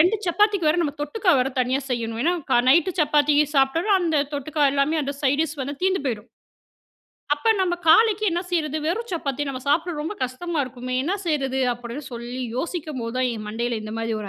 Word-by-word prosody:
2 365 +7 +4
சப்பாத்திக்கு 400 -1 +2
வேற, 310 - +3
நம்ம 290 -3 -1
தொட்டுக்க 360 +7 -3
வேற 255 +1 +2
தனியா 255 +3 +1
செய்யணும். 230 -2 -2
ஏன்னா, 345 +3 +2 0.2
கா - - +5
நைட்டு 335 +6 +5
சப்பாத்தி 295 -1 +3 0.2
சாப்பிட்டாலும், 325 +10 +3
அந்த 330 -3 +1 0.2
தொட்டுக்க 285 0 +1
எல்லாமே 285 +3 +1
அந்த 280 +1 -3
சைட் 285 +2 +2
டிஷ் 315 -2 -5
வந்து 280 +2 -3
தீர்ந்து 375 0 +2
போயிடும். 230 -2 -3 1.1
"அப்ப 445 +10 +2
நம்ம 355 -2 +1
காலைக்கு 430 +4 +5
என்ன 345 +1 0
செய்றது 315 -3 0
வெறும் 460 +8 -2
சப்பாத்தி 290 -3 -2
நம்ம 260 -1 -4
சாப்பிடறது 330 +1 +1
ரொம்ப 325 +7 -4
கஷ்டமாக 295 +4 -2
இருக்குமே 255 0 -6
என்ன 360 +7 -1
செய்றது?" 270 -4 0
அப்படின்னு 240 +4 -8
சொல்லி 240 +2 -5
யோசிக்கும்போது 290 -7 -4
தான் 255 -1 +2
என் 215 -1 -7
மண்டையில் 230 +1 -2
இந்த 215 0 -6
மாதிரி 225 0 -2
ஒரு 200 - -6
290 Hz, 190 wpm, -23 LUFS, 255-340 Hz, 1.1 s, கா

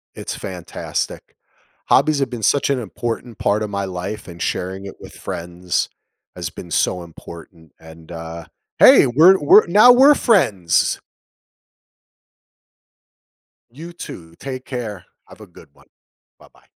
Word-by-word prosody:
It's - - -6
fantastic. 90 -3 -6 0.5
Hobbies 155 -2 +3
have 135 -3 -1
been 120 -4 -7
such 140 - +2
an 140 -2 0
important 115 +1 -6
part 105 +1 0
of 105 - -4
my 100 -1 -3
life 95 +3 -6
and 85 -1 -11
sharing 95 +2 -3
it 100 - -9
with - - -13
friends 90 +1 -4 0.5
has 85 -1 -5
been 85 +1 -11
so 90 +1 0
important, 85 -1 -14
and, 80 +1 -15
uh 80 0 -8 0.3
hey! - - +8
We're 165 +10 +6
we're 150 +8 +6
now 215 +7 +7
we're 275 +4 +6
friends! 100 - +1 2.7
You 165 +7 -11
too, 85 - -10
take 130 -2 -7
care, 110 -7 -6 0.2
have - - -16
a - - -12
good - - -17
one. - - -24 0.5
Bye-bye. - - -22
100 Hz, 135 wpm, -19 LUFS, 85-135 Hz, 2.7 s, hey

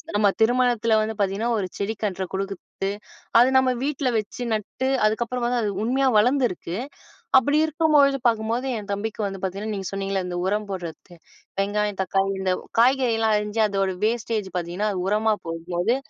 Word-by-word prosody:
நம்ம 205 0 +4
திருமணத்தில 240 -1 +3
வந்து 220 +1 -2
பாத்தீங்கன்னா 200 +4 0
ஒரு 195 - -1
செடி 205 +2 -1
கன்ற 190 -2 -1
குடுக்குறது, 195 0 -4 0.5
அது 245 +2 +6
நம்ம 260 -1 +4
வீட்ல 280 -2 0
வெச்சு 215 +4 -6
நட்டு 220 +5 -2 0.2
அதுக்கப்புறம் 235 +3 0
வந்து 245 -1 +1
அது 210 - 0
உண்மையா 265 +3 +2
வளர்ந்திருக்கு. 235 -7 +1 0.6
அப்டி 285 +3 +3
இருக்கும்பொழுது 300 -3 +3
பாக்கும்போது, 230 +3 0
என் 210 -2 -7
தம்பிக்கு 215 +2 -3
வந்து 195 -1 -4
பாத்தீங்கன்னா 200 +3 -3
நீங்க 195 -2 -4
சொன்னிங்கல்ல 195 -1 -2
இந்த 175 -1 -4
உரம் 210 +2 0
போடுறதுக்கு 175 -1 -7 0.4
வெங்காயம், 205 0 0
தக்காளி 195 +1 +1
இந்த 185 -1 +1 0.3
காய்கறி 255 0 +4
எல்லாம் 220 -1 +2
அரிஞ்சு 210 +1 -3
அதோட 195 -1 0
வேஸ்டேஜ் 225 -3 -1
பாத்தீங்கன்னா 175 +5 -2
அது 185 - -3
உரமா 215 +1 +2
போடும்போது, 175 +7 -1
215 Hz, 155 wpm, -24 LUFS, 195-240 Hz, 0.6 s, அது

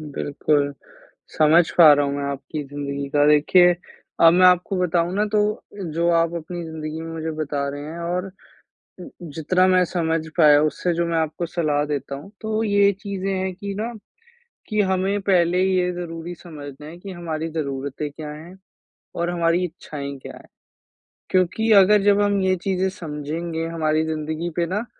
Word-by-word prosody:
बिल्कुल, 145 0 0 0.6
समझ 160 +2 +5
पा 165 -4 +9
रहा 145 0 +2
हूँ 140 - -2
मैं 140 - -3
आपकी 145 +2 -6
ज़िंदगी 140 0 -5
का 145 +1 +3
देखिए, 175 +4 +5 0.5
अब 165 0 +8
मैं 185 +1 +5
आपको 180 +1 +2
बताऊँ 175 0 +1
ना 210 +1 +2
तो 210 - +4 0.5
जो 170 +2 +1
आप 165 0 0
अपनी 170 +1 -6
ज़िंदगी 160 -1 -6
में 165 0 -7
मुझे 160 0 -4
बता 140 -2 -2
रहे 145 +1 -6
हैं 170 - -8
और 180 +2 -3 1.0
जितना 185 +4 +2
मैं 185 -1 +4
समझ 165 -2 -1 0.2
पाया 150 -3 +6
उससे 155 +3 0
जो 170 +1 0
मैं 165 -1 0
आपको 160 +2 -2
सलाह 155 -4 0
देता 140 -2 -4
हूँ। 145 +8 -11
तो 220 0 -1
ये 200 -1 +4
चीज़ें 195 -1 -3
हैं 190 0 -2
कि 200 +2 -6
ना, 230 +3 -3 0.8
कि 215 -1 +1
हमें 190 +1 0
पहले 180 -2 +2
ये 185 -1 +1
ज़रूरी 175 0 -6
समझना 150 -4 -10
है 165 +2 -10
कि 195 +2 -8
हमारी 165 -2 -4
ज़रूरते 140 -1 -4
क्या 150 +1 -8
है, 160 +5 -11 0.6
और 170 +1 -1
हमारी 170 0 +1
इच्छाएँ 145 -5 -7
क्या - - -9
है? - - -14 0.9
क्योंकि 185 +5 +1
अगर 205 +1 +6
जब 205 0 +4
हम 205 -1 +2
ये 190 0 +2
चीज़ें 190 -1 0
समझेंगे, 165 -1 -5
हमारी 155 -1 0
ज़िंदगी 160 +1 -3
पे 175 - +1
ना 205 +6 -2
170 Hz, 170 wpm, -22 LUFS, 155-185 Hz, 1.0 s, पा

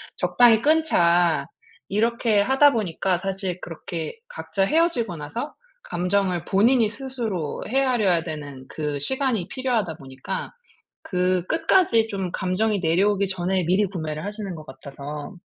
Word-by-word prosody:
"적당히 235 -2 +4
끊자." 175 - +3 0.4
이렇게 225 +1 +2
하다 270 +6 +5
보니까 190 - 0
사실 190 -1 -3
그렇게 165 - -6
각자 345 - -2
헤어지고 300 - +1
나서 230 - -5 0.3
감정을 185 - -1
본인이 225 +3 +3
스스로 225 - -4
헤아려야 240 -9 +2
되는 145 -5 -7
그 150 -2 -3
시간이 245 - -1
필요하다 235 -8 -1
보니까 135 +7 -6 0.5
그 180 -1 0
끝까지 320 - +3
좀 195 -4 -3
감정이 200 +3 0
내려오기 195 +4 +2
전에 185 0 -1
미리 185 +5 +2
구매를 155 -4 -5
하시는 205 -2 -5
것 155 -2 -9
같아서. 145 +4 -8
195 Hz, 300 characters per minute, -23 LUFS, 170-230 Hz, 0.5 s, 하다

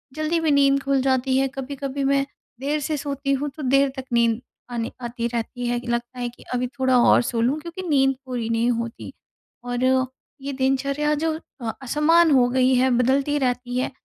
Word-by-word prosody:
जल्दी 310 +2 0
भी 320 -2 +1
नींद 275 -1 +4
खुल 275 -1 +1
जाती 260 0 +1
है, 270 - +2
कभी-कभी 275 +1 -5
मैं 275 0 +2 0.3
देर 290 +3 -1
से 300 +1 -2
सोती 280 -1 -3
हूँ 285 +2 -1
तो 305 - -7
देर 275 +2 +3
तक 265 - -5
नींद 235 -1 +2 0.3
आने 235 -1 -3
आती 235 0 -3
रहती 240 +1 -4
है। 240 0 0
लगता 240 +1 -3
है 245 -1 -2
कि 240 - -17
अभी 250 0 0
थोड़ा 260 -1 +3
और - - +6
सो 235 -1 -2
लूँ 265 +6 +1
क्योंकि 340 +4 -7
नींद 270 -2 +3
पूरी 245 -3 -3
नहीं 230 +1 +1
होती। 235 -1 -4 0.5
और 245 0 -2 0.6
ये 280 +1 -4
दिनचर्या 275 +3 0
जो 320 +1 0 0.5
असमान 310 +5 +3
हो 255 -3 +5
गई 255 +1 +3
है, 255 +1 +3
बदलती 270 +4 +2
रहती 250 -1 -1
है, 255 - -1
265 Hz, 190 wpm, -23 LUFS, 245-280 Hz, 0.6 s, और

